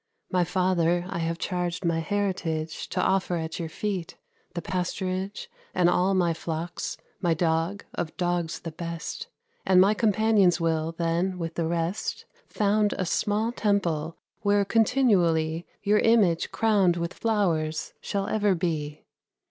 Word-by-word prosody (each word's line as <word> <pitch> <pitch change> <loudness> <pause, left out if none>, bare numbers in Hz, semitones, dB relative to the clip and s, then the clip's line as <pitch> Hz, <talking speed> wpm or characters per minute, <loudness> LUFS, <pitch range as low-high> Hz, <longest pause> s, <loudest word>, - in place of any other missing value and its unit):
My 180 -1 +3
father 175 -1 +1
I - - -3
have 165 0 -1
charged 180 0 -2
my 165 -1 +1
heritage 165 -4 -2
To - - -2
offer 190 -2 +1
at 160 0 -4
your 165 -2 -3
feet: 190 -1 -4 0.4
the 170 - -2
pasturage, 185 +2 -3 0.3
And 175 -1 +4
all 190 +2 +2
my 175 -3 +2
flocks, 165 +1 -4 0.2
my 170 -3 +1
dog, 165 +4 0
of 165 -2 -4
dogs 175 -2 -1
the 165 - -6
best; 170 - -5 0.4
And 185 -1 +5
my 195 +3 +6
companions 210 -4 +3
will, 165 -1 0
then, 170 +3 0
with 165 -2 -4
the 165 -1 -1
rest, 170 +5 -2 0.2
Found 210 0 +1
a 185 - -1
small 215 +5 0
temple, 170 -8 0 0.2
where 205 -1 +3
continually 180 -9 +2 0.2
Your 210 +1 +3
image, 205 -8 +3
crowned 200 -6 +3
with 170 0 -3
flowers, 165 -8 0
shall 200 -1 -2
ever 205 -3 +2
be. 155 -4 -3
180 Hz, 140 wpm, -26 LUFS, 165-200 Hz, 0.4 s, my